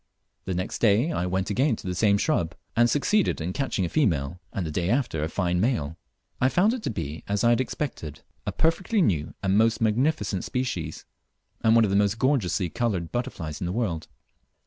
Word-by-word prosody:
The 95 Hz, -, -2 dB
next 90 Hz, +1 st, -3 dB
clay 115 Hz, +8 st, +3 dB
I 90 Hz, -, -1 dB
went 95 Hz, +2 st, -1 dB
again 130 Hz, +5 st, +2 dB
to -, -, -12 dB
the 90 Hz, -, -2 dB
same 100 Hz, +2 st, +3 dB
shrub 90 Hz, -, 0 dB, 0.2 s
and 120 Hz, +1 st, +4 dB
succeeded 180 Hz, -, +2 dB
in 85 Hz, +3 st, -3 dB
catching 130 Hz, -8 st, -1 dB
a -, -, -1 dB
female, 85 Hz, -, 0 dB
and 95 Hz, -, -3 dB
the 80 Hz, -, -3 dB
day 85 Hz, +3 st, -1 dB
after 120 Hz, -, 0 dB
a 80 Hz, -, -1 dB
fine 90 Hz, 0 st, 0 dB
male. 80 Hz, -, 0 dB, 0.5 s
I 130 Hz, -, +4 dB
found 200 Hz, -, +3 dB
it 255 Hz, -, -4 dB
to -, -, -2 dB
be 80 Hz, -, -5 dB
as 100 Hz, 0 st, 0 dB
I 120 Hz, -, +5 dB
had 120 Hz, -, +3 dB
expected, 125 Hz, -, -5 dB, 0.3 s
a -, -, +1 dB
perfectly 185 Hz, +6 st, +1 dB
new 80 Hz, -, 0 dB
and 95 Hz, +1 st, +3 dB
most 115 Hz, +2 st, +3 dB
magnificent 110 Hz, -, +1 dB
species, 90 Hz, -12 st, -3 dB, 0.6 s
and 110 Hz, 0 st, +5 dB
one 115 Hz, -, +6 dB
of 105 Hz, -, +1 dB
the -, -, +2 dB
most 100 Hz, +1 st, +2 dB
gorgeously 105 Hz, -, +1 dB
coloured 100 Hz, -7 st, -2 dB
butterflies 95 Hz, -, -4 dB
in 90 Hz, -, -1 dB
the -, -, -2 dB
world. 90 Hz, -7 st, -2 dB
105 Hz, 205 wpm, -26 LUFS, 90-125 Hz, 0.6 s, one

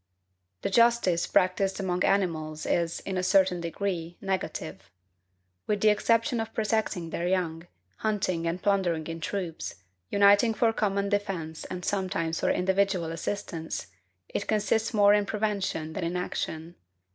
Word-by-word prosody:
The -, -, -1 dB
justice 230 Hz, -7 st, +3 dB
practised 190 Hz, +2 st, +2 dB
among 180 Hz, -2 st, 0 dB
animals 160 Hz, -6 st, 0 dB
is, 170 Hz, -1 st, 0 dB
in 190 Hz, -1 st, -3 dB
a -, -, +1 dB
certain 185 Hz, -1 st, +3 dB
degree, 170 Hz, -1 st, -3 dB
negative. 195 Hz, -1 st, -4 dB, 0.8 s
With 210 Hz, -1 st, 0 dB
the 215 Hz, -, +6 dB
exception 230 Hz, +4 st, +2 dB
of 225 Hz, -, -4 dB
protecting 215 Hz, -6 st, -1 dB
their 170 Hz, -, -2 dB
young, 175 Hz, -2 st, -1 dB, 0.3 s
hunting 185 Hz, -6 st, -1 dB
and 170 Hz, +2 st, -1 dB
plundering 180 Hz, -6 st, +1 dB
in 165 Hz, +1 st, -5 dB
troops, 170 Hz, -, -4 dB, 0.3 s
uniting 205 Hz, +3 st, +5 dB
for 225 Hz, 0 st, +3 dB
common 200 Hz, -2 st, 0 dB
defence 190 Hz, -6 st, -2 dB
and 180 Hz, 0 st, -6 dB
sometimes 185 Hz, -5 st, -1 dB
for -, -, +1 dB
individual 190 Hz, -2 st, +1 dB
assistance, 165 Hz, -1 st, -4 dB, 0.4 s
it 200 Hz, -, -4 dB
consists 215 Hz, +1 st, +1 dB
more 205 Hz, -2 st, +5 dB
in 205 Hz, -1 st, +2 dB
prevention 200 Hz, -7 st, -2 dB
than 180 Hz, -, -3 dB
in 175 Hz, +2 st, -1 dB
action. 165 Hz, -2 st, -4 dB
190 Hz, 140 wpm, -28 LUFS, 170-205 Hz, 0.8 s, the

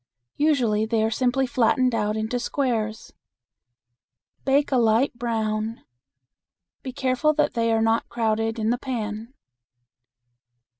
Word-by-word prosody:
Usually 240 Hz, -8 st, +2 dB
they 225 Hz, -1 st, +1 dB
are 220 Hz, -, 0 dB
simply 255 Hz, +3 st, +1 dB
flattened 250 Hz, +1 st, +2 dB
out 210 Hz, -1 st, 0 dB
into 220 Hz, +3 st, -2 dB
squares. 230 Hz, -5 st, -2 dB, 1.3 s
Bake 280 Hz, +2 st, +2 dB
a 260 Hz, -, +3 dB
light 230 Hz, +3 st, +3 dB
brown. 225 Hz, -2 st, -2 dB, 1.0 s
Be 260 Hz, -, -6 dB
careful 260 Hz, +3 st, +1 dB
that 300 Hz, -1 st, +1 dB
they 230 Hz, -1 st, +1 dB
are 225 Hz, 0 st, +2 dB
not 225 Hz, +1 st, +1 dB
crowded 225 Hz, -1 st, -1 dB
in 220 Hz, 0 st, 0 dB
the 245 Hz, -, -1 dB
pan. 230 Hz, -1 st, -5 dB
230 Hz, 120 wpm, -24 LUFS, 220-255 Hz, 1.3 s, a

